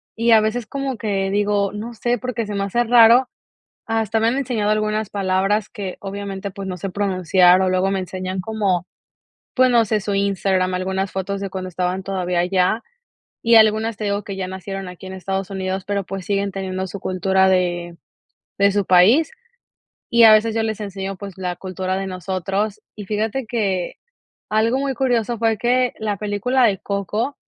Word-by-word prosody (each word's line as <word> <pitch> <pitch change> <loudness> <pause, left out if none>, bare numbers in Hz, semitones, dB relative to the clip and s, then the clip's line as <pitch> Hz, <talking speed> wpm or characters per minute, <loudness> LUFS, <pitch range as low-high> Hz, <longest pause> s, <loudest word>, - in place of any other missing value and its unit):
y 230 +1 +2
a 220 -1 +7
veces 220 +1 -2
como 275 0 -3
que 195 -3 -1
digo, 205 -1 +1
no 220 +3 -6
sé, 240 +2 -1
porque 240 -1 -3
se 210 - -5
me 200 -1 -1
hace 235 +5 +1
raro, 240 +2 +6 0.6
hasta 225 -1 0
me 225 +1 +2
han 250 +4 0
enseñado 230 -6 -1
algunas 215 0 0
palabras 195 +1 0
que 200 -5 -6
obviamente, 200 0 -5
pues, 195 0 -7
no 185 -1 -5
sé 195 - -4
pronunciar 185 -2 +3
o 190 - +2
luego 185 +1 +1
me 195 - 0
enseñan 185 0 -4
como, 190 -4 -1 0.7
pues, 255 -1 +4
no 235 -2 +4
sé, 215 0 0
su 200 0 -3
Instagram, 195 -2 +1
algunas 190 +1 -2
fotos 195 +1 -3
de 195 -1 -4
cuando 185 -1 -5
estaban 180 +1 -2
todavía 180 -2 -2
allá, 185 +5 +1 0.6
y 230 0 +5
algunas 220 0 +4
te 215 - -4
digo 200 0 -1
que 195 - -6
ya 185 -1 -3
nacieron 190 0 -6
aquí 180 +1 -11
en 190 - -7
Estados 190 0 -4
Unidos, 190 -1 -3
pero, 200 -1 -1
pues, 195 0 -6
siguen 200 0 -1
teniendo 190 -1 -4
su 195 +2 -7
cultura 190 +1 +1
de 175 -2 -1 0.6
de 200 0 +5
su 200 0 0
país, 215 - +5 0.8
y 235 0 +6
a 220 -1 +9
veces 215 +1 +3
yo 225 - 0
les 220 -1 -3
enseño, 195 -1 -5
pues, 195 0 -9
la 180 -1 -3
cultura 185 +1 -4
de 195 0 -2
nosotros, 195 +3 -3
y 210 - -8
fíjate 220 +5 -2
que, 195 -6 -1 0.6
algo 225 +4 +2
muy 275 -1 -1
curioso 240 -2 0
fue 225 -1 +1
que 250 +2 +1
la 210 -2 -2
película 210 +6 0
de 200 -4 +3
Coco, 210 +8 -3
200 Hz, 190 wpm, -21 LUFS, 190-220 Hz, 0.8 s, a